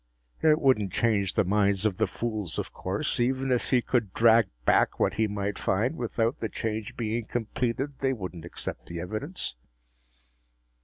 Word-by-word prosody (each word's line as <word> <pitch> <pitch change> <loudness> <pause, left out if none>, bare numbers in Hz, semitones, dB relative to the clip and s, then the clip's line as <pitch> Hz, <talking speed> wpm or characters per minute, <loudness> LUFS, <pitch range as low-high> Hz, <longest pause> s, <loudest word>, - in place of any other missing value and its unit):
It 155 -1 +5
wouldn't 110 - +3
change 100 -4 +1
the - - +4
minds 100 +1 +2
of 100 -4 +1
the 110 0 +2
fools, 105 -4 -3
of - - -4
course. 130 +9 -1
Even 130 +2 +1
if 125 - +1
he 125 -2 +3
could 115 -7 0
drag 115 -2 +6 0.2
back - - +3
what - - +2
he 110 0 +1
might 100 -1 -3
find, 110 +10 +1
without 115 -2 -1
the 110 - -2
change 110 -1 -4
being 115 0 -2
completed, 125 +4 -2
they 135 -1 +1
wouldn't 90 -8 -5
accept 85 - -6
the 85 0 -5
evidence. 110 - -4
110 Hz, 165 wpm, -28 LUFS, 100-125 Hz, 0.2 s, drag